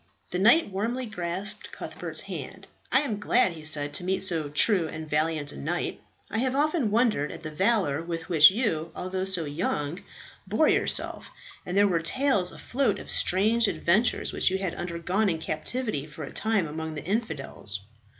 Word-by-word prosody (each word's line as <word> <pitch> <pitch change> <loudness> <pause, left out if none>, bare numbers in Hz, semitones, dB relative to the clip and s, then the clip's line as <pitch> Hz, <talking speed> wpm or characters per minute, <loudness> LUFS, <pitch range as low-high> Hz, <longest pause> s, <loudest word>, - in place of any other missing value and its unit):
The 180 - -1
knight 230 - +5
warmly 235 +7 -2
grasped 190 -2 -5
Cuthbert's - - -5
hand. - - -7 0.3
"I 265 - +6
am 225 -8 -3
glad," 220 -1 +3
he 160 -2 -10
said, 145 -1 -1
"to 180 - -4
meet 190 +1 0
so 165 -6 -1
true 170 +3 +3
and 155 0 -7
valiant 155 -1 0
a - - -10
knight. 70 - -3 0.3
I 220 - -1
have 260 +1 0
often 295 -4 +1
wondered 215 - +2
at 165 0 -9
the 155 - -5
valour 185 -4 +1
with 165 -1 -5
which 155 -4 +8
you, 185 -7 -1
although 185 +1 -3
so 185 -4 -1
young, 150 +1 -2 0.5
bore 215 +11 +3
yourself; - - +2 0.4
and 180 +2 -1
there 205 0 +6
were 175 -4 +1
tales 200 - +2
afloat 250 -5 -1
of - - -6
strange 220 +5 +2
adventures 200 +6 +1
which - - +3
you 190 - 0
had 190 -3 -3
undergone 180 +4 -1
in 165 - 0
captivity 160 - -3
for 155 +1 -9
a - - -8
time 215 -6 +1
among 160 +1 -5
the 150 - -7
infidels." 155 - -3
180 Hz, 180 wpm, -27 LUFS, 160-220 Hz, 0.5 s, which